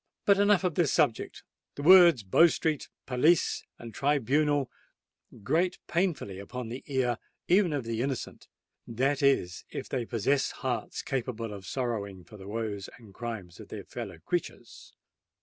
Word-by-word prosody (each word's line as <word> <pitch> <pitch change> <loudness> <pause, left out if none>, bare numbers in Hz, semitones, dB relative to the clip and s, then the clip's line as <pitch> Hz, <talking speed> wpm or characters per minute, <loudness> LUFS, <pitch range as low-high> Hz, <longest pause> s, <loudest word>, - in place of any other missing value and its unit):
But 200 -1 +5
enough 200 -2 +4
of 180 -3 +1
this 165 -2 +2
subject: 115 - 0 0.3
the 145 - -6
words 175 - +8
Bow 130 - +6
Street—Police—and 150 -5 -1
Tribunal 145 +1 +1 0.7
grate 170 - +1
painfully 170 - -1
upon 120 +4 -6
the 125 +3 -6
ear 130 -4 0 0.3
even 180 -1 +4
of 145 -3 -1
the 115 0 -3
innocent,—that 135 0 -4
is, 100 -10 +2
if - - -6
they 125 -4 -3
possess 135 +5 +1 0.2
hearts 120 -4 -2
capable 115 -4 -3
of 95 -2 -9
sorrowing 105 -8 -3
for 105 +5 -14
the 95 -1 -11
woes 105 -2 -4
and 110 -5 -16
crimes 110 -7 -7
of - - -10
their - - -7
fellow - - -7
creatures. - - -5
125 Hz, 140 wpm, -29 LUFS, 110-150 Hz, 0.7 s, words